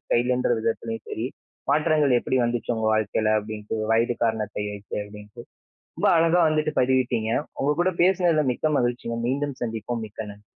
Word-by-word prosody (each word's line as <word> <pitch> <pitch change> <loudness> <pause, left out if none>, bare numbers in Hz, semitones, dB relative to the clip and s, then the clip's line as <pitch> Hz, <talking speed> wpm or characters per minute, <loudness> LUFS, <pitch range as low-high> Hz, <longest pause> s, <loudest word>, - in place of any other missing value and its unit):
ஸ்டைலுன்ற 125 +1 +1
விதத்திலயும் 115 0 -3
சரி, 115 - -3 0.5
மாற்றங்கள் 150 -3 +3
எப்பிடி 130 - 0
வந்துச்சு 120 0 -1
உங்க 110 -1 -1
வாழ்க்கையில. 110 0 +1
அப்பிடின்ட்டு 105 0 -5 0.2
வயது 115 +1 +2
காரணத்தை 105 -2 -1
வைத்து 100 0 -7
அப்பிடின்ட்டு. 105 +1 -12 0.6
ரொம்ப - - +3
அழகா 165 +2 +4
வந்துட்டு 155 0 0
பதிவிட்டீங்க. 125 -3 +1 0.3
உங்க 145 +2 +2
கூட 185 - +3
பேசுனதுல 175 -4 +3
மிக்க 155 +5 -1
மகிழ்ச்சிங்க. 120 -1 -2
மீண்டும் 140 +1 -1
சந்திப்போம். 115 0 -3
மிக்க 105 - -20
நன்றி. 105 0 -16
120 Hz, 145 wpm, -24 LUFS, 110-145 Hz, 0.6 s, அழகா